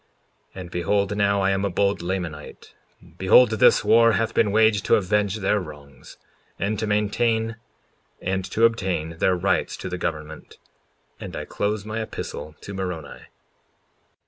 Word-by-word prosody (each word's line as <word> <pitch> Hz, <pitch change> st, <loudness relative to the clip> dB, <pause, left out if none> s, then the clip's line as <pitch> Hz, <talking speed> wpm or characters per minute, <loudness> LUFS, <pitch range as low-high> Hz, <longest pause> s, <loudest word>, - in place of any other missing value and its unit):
54:24 95 Hz, -, -6 dB
And 90 Hz, -2 st, -10 dB
behold 100 Hz, +3 st, 0 dB
now, 100 Hz, -1 st, +2 dB
I 95 Hz, 0 st, +2 dB
am 95 Hz, 0 st, 0 dB
a 100 Hz, -, 0 dB
bold 100 Hz, +2 st, 0 dB
Lamanite; 85 Hz, -4 st, -6 dB, 0.5 s
behold, 110 Hz, +6 st, +6 dB
this 110 Hz, -, +4 dB
war 115 Hz, 0 st, +5 dB
hath 115 Hz, +1 st, 0 dB
been 105 Hz, -3 st, +2 dB
waged 110 Hz, -1 st, +3 dB
to -, -, +4 dB
avenge 105 Hz, 0 st, 0 dB
their 105 Hz, 0 st, +1 dB
wrongs, 75 Hz, -6 st, -12 dB, 0.4 s
and 100 Hz, +2 st, -2 dB
to 110 Hz, -, -2 dB
maintain 110 Hz, +2 st, 0 dB, 0.6 s
and 95 Hz, +1 st, -2 dB
to 110 Hz, +4 st, +2 dB
obtain 90 Hz, -7 st, -1 dB
their 95 Hz, -, +3 dB
rights 90 Hz, -, 0 dB
to 95 Hz, -, -6 dB
the 90 Hz, 0 st, -5 dB
government; 75 Hz, -2 st, -6 dB, 0.6 s
and -, -, -8 dB
I -, -, -5 dB
close 105 Hz, 0 st, -2 dB
my 110 Hz, +1 st, -4 dB
epistle 80 Hz, -7 st, -7 dB
to 100 Hz, -, -8 dB
Moroni. 90 Hz, -6 st, -6 dB
100 Hz, 155 wpm, -23 LUFS, 90-110 Hz, 0.6 s, behold